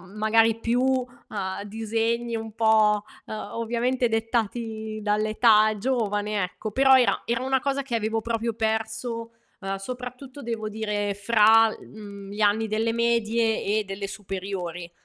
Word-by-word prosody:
magari 225 Hz, +1 st, +3 dB
più, 235 Hz, +2 st, +1 dB
uhm, 245 Hz, -7 st, -2 dB
disegni 225 Hz, +2 st, -1 dB
un 220 Hz, -1 st, -5 dB
po', 215 Hz, -2 st, +3 dB, 0.2 s
uhm, 215 Hz, -, -6 dB, 0.2 s
ovviamente 240 Hz, +2 st, 0 dB
dettati 225 Hz, -1 st, -2 dB
dall'età 215 Hz, +1 st, +3 dB
giovane 210 Hz, -4 st, -1 dB
ecco, 205 Hz, +4 st, -5 dB
però 265 Hz, +3 st, +6 dB
era 250 Hz, -, +2 dB
era 235 Hz, +2 st, -1 dB
una 265 Hz, 0 st, +1 dB
cosa 275 Hz, +1 st, -1 dB
che 260 Hz, -3 st, -7 dB
avevo 220 Hz, 0 st, -1 dB
proprio 230 Hz, 0 st, -2 dB
perso, 225 Hz, +1 st, -2 dB, 0.3 s
uhm, 195 Hz, -1 st, -3 dB
soprattutto 250 Hz, +6 st, -7 dB
devo 225 Hz, -3 st, -4 dB
dire 210 Hz, -1 st, -2 dB
fra 220 Hz, +2 st, +5 dB
l -, -, -7 dB
mhmm, 200 Hz, -2 st, -10 dB
gli 210 Hz, -, -5 dB
anni 215 Hz, +2 st, +3 dB
delle 220 Hz, +2 st, 0 dB
medie, 230 Hz, -1 st, +1 dB
e 210 Hz, +2 st, +1 dB
delle 195 Hz, 0 st, -5 dB
superiori. 185 Hz, -4 st, -5 dB
220 Hz, 140 wpm, -25 LUFS, 210-235 Hz, 0.3 s, però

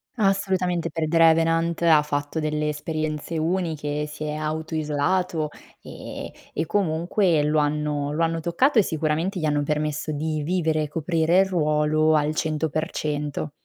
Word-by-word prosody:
Assolutamente, 190 Hz, -4 st, +1 dB
per 160 Hz, 0 st, -2 dB
"The 165 Hz, +1 st, +1 dB
Revenant" 165 Hz, +1 st, +3 dB
ha 160 Hz, -3 st, +6 dB
fatto 145 Hz, +1 st, -3 dB
delle 150 Hz, 0 st, -1 dB
esperienze 155 Hz, +1 st, -3 dB
uniche, 155 Hz, -3 st, -1 dB
si 150 Hz, 0 st, -7 dB
è 150 Hz, 0 st, -3 dB
auto-isolato 155 Hz, +1 st, -1 dB, 0.3 s
e -, -, -8 dB, 0.2 s
e 160 Hz, -, -1 dB
comunque 170 Hz, -2 st, +1 dB
lo 150 Hz, +1 st, +2 dB
hanno 150 Hz, -1 st, -1 dB
lo 165 Hz, +3 st, 0 dB
hanno 165 Hz, 0 st, 0 dB
toccato 220 Hz, -, +2 dB
e -, -, +7 dB
sicuramente 160 Hz, +4 st, -1 dB
gli 155 Hz, -, -1 dB
hanno 145 Hz, -1 st, +1 dB
permesso 150 Hz, +1 st, -2 dB
di 155 Hz, +1 st, -2 dB
vivere 160 Hz, -2 st, 0 dB
e -, -, -3 dB
coprire 165 Hz, +3 st, +1 dB
il 195 Hz, -, +3 dB
ruolo 155 Hz, -2 st, +2 dB
al 150 Hz, 0 st, +1 dB
100%. 155 Hz, -1 st, -2 dB
155 Hz, 145 wpm, -24 LUFS, 150-165 Hz, 0.3 s, e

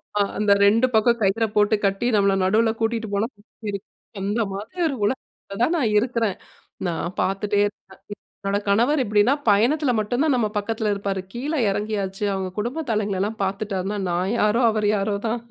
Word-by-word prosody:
ஆமா, 210 Hz, -, -4 dB, 0.2 s
அந்த 210 Hz, -1 st, +3 dB
2 230 Hz, +5 st, +4 dB
பக்கம் 235 Hz, +2 st, +4 dB
கயிறை 210 Hz, +3 st, +2 dB
போட்டு 210 Hz, +1 st, +4 dB
கட்டி 195 Hz, +5 st, 0 dB
நம்மள 200 Hz, -1 st, +3 dB
நடுவில 220 Hz, +4 st, +3 dB
கூட்டிட்டு 225 Hz, -1 st, -1 dB
போனா, 205 Hz, +3 st, +1 dB, 1.0 s
அந்த 205 Hz, +4 st, -1 dB
மாதிரி 215 Hz, -, -7 dB
ஒரு 280 Hz, -, -3 dB
உலகத்தில 205 Hz, -3 st, -4 dB
தான் 345 Hz, -, +1 dB
நான் 225 Hz, -7 st, +1 dB
இருக்கிறேன். 230 Hz, -3 st, 0 dB, 0.5 s
நான் 170 Hz, +1 st, -3 dB
பார்த்துட்டே 200 Hz, +2 st, 0 dB
இருக்கேன், 190 Hz, -2 st, -14 dB, 0.5 s
என்னோட 200 Hz, +1 st, +1 dB
கணவர் 245 Hz, +9 st, +3 dB
எப்படின்னா 210 Hz, +5 st, +3 dB, 0.2 s
பயணத்தில 250 Hz, +8 st, +3 dB
மட்டும் 245 Hz, +7 st, 0 dB
தான் 295 Hz, -4 st, +3 dB
நம்ம 215 Hz, -3 st, +1 dB
பக்கத்தில 215 Hz, +1 st, -1 dB
இருப்பார், 195 Hz, -1 st, -3 dB
கீழ 265 Hz, +6 st, -3 dB, 0.2 s
இறங்கியாச்சு 200 Hz, -1 st, -2 dB
அவங்க 190 Hz, -1 st, -3 dB
குடும்ப 255 Hz, +9 st, -2 dB
தலைங்களலாம் 210 Hz, 0 st, -1 dB
பார்த்துட்டாருன்னா 200 Hz, 0 st, -3 dB
நான் 185 Hz, +5 st, 0 dB
யாரோ 210 Hz, +4 st, +3 dB
அவரு 210 Hz, -1 st, +1 dB
யாரோ 200 Hz, +1 st, -1 dB
தான். 230 Hz, +1 st, -2 dB
210 Hz, 160 wpm, -23 LUFS, 200-230 Hz, 1.0 s, 2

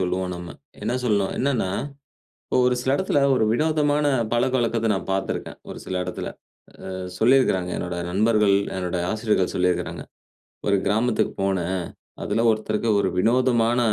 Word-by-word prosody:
சொல்லுவோம் 90 Hz, 0 st, -1 dB
நம்ம. 85 Hz, 0 st, -7 dB, 0.3 s
என்ன 120 Hz, -, -1 dB
சொல்லணும்? 100 Hz, -5 st, +1 dB
என்னன்னா, 125 Hz, -7 st, 0 dB, 0.8 s
இப்ப -, -, 0 dB
ஒரு 125 Hz, -, +3 dB
சில 130 Hz, -, 0 dB
இடத்துல 190 Hz, -5 st, +1 dB
ஒரு 120 Hz, -, +2 dB
வினோதமான 150 Hz, +1 st, +1 dB, 0.3 s
பழக்கவழக்கத்த 120 Hz, -2 st, +1 dB
நான் 95 Hz, -, -5 dB
பார்த்துருக்கேன். 95 Hz, 0 st, -3 dB
ஒரு -, -, -7 dB
சில 95 Hz, -, -5 dB
இடத்துல, 90 Hz, -, -5 dB, 0.6 s
அ -, -, -5 dB, 0.3 s
சொல்லியிருக்கிறாங்க 110 Hz, -7 st, +3 dB
என்னோட 90 Hz, 0 st, -4 dB
நண்பர்கள், 105 Hz, +1 st, +3 dB, 0.2 s
என்னோட 90 Hz, -1 st, -2 dB
ஆசிரியர்கள் 110 Hz, -4 st, 0 dB
சொல்லியிருக்கிறாங்க. 90 Hz, -1 st, -1 dB, 0.6 s
ஒரு 100 Hz, -, +4 dB
கிராமத்துக்கு 110 Hz, +4 st, +1 dB
போனேன், 95 Hz, -2 st, -1 dB, 0.4 s
அதில 115 Hz, -, 0 dB
ஒருத்தருக்கு 110 Hz, +1 st, -1 dB
ஒரு 95 Hz, -, +1 dB
வினோதமான 120 Hz, +1 st, +2 dB
110 Hz, 135 wpm, -23 LUFS, 95-125 Hz, 0.8 s, ஒரு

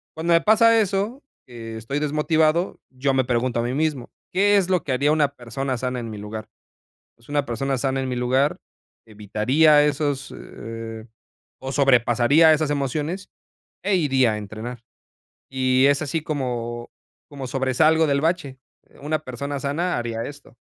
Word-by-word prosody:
cuando 170 Hz, +1 st, +1 dB
me 165 Hz, -, +5 dB
pasa 225 Hz, +3 st, +5 dB
eso, 205 Hz, +7 st, -2 dB, 0.2 s
que 115 Hz, -2 st, -8 dB
estoy 125 Hz, +6 st, -3 dB
desmotivado, 155 Hz, +3 st, +1 dB
yo 135 Hz, +1 st, -1 dB
me 130 Hz, -1 st, +2 dB
pregunto 120 Hz, -1 st, 0 dB
a -, -, -2 dB
mí 120 Hz, +2 st, -2 dB
mismo, 145 Hz, -4 st, -1 dB, 0.2 s
¿qué 205 Hz, +2 st, +4 dB
es 190 Hz, -2 st, +1 dB
lo 180 Hz, -4 st, +1 dB
que 140 Hz, -, -4 dB
haría 140 Hz, +4 st, +2 dB
una 150 Hz, -3 st, +2 dB
persona 130 Hz, +2 st, -4 dB
sana 125 Hz, +1 st, -3 dB
en 115 Hz, -, -6 dB
mi 105 Hz, -, -7 dB
lugar? 105 Hz, +1 st, -7 dB, 0.7 s
Pues, 115 Hz, -, -24 dB
una 145 Hz, -1 st, 0 dB
persona 135 Hz, +3 st, -2 dB
sana 135 Hz, +1 st, -1 dB
en 130 Hz, -, -3 dB
mi 125 Hz, -, -2 dB
lugar, 130 Hz, +4 st, +1 dB, 0.5 s
evitaría 130 Hz, +9 st, +3 dB
esos, 145 Hz, -1 st, -2 dB
eh, 115 Hz, 0 st, -8 dB, 0.5 s
o 130 Hz, 0 st, -5 dB
sobrepasaría 135 Hz, +3 st, +4 dB
esas 155 Hz, -1 st, 0 dB
emociones, 150 Hz, +7 st, -2 dB, 0.5 s
e 200 Hz, 0 st, +2 dB
iría 135 Hz, -8 st, +2 dB
a -, -, -3 dB
entrenar. 110 Hz, +3 st, -7 dB, 0.7 s
Y 130 Hz, 0 st, +2 dB
es 140 Hz, +1 st, +2 dB
así 155 Hz, +1 st, -2 dB
como 120 Hz, -5 st, -4 dB, 0.4 s
como 135 Hz, -3 st, -7 dB
sobresalgo 150 Hz, +5 st, +2 dB
del 140 Hz, 0 st, +2 dB
bache. 155 Hz, -5 st, -1 dB, 0.3 s
Eh, -, -, -21 dB
una 155 Hz, +2 st, -1 dB
persona 140 Hz, +1 st, -5 dB
sana 160 Hz, +5 st, -1 dB
haría 115 Hz, -1 st, -3 dB
esto. 145 Hz, -4 st, -10 dB
135 Hz, 160 wpm, -23 LUFS, 120-155 Hz, 0.7 s, me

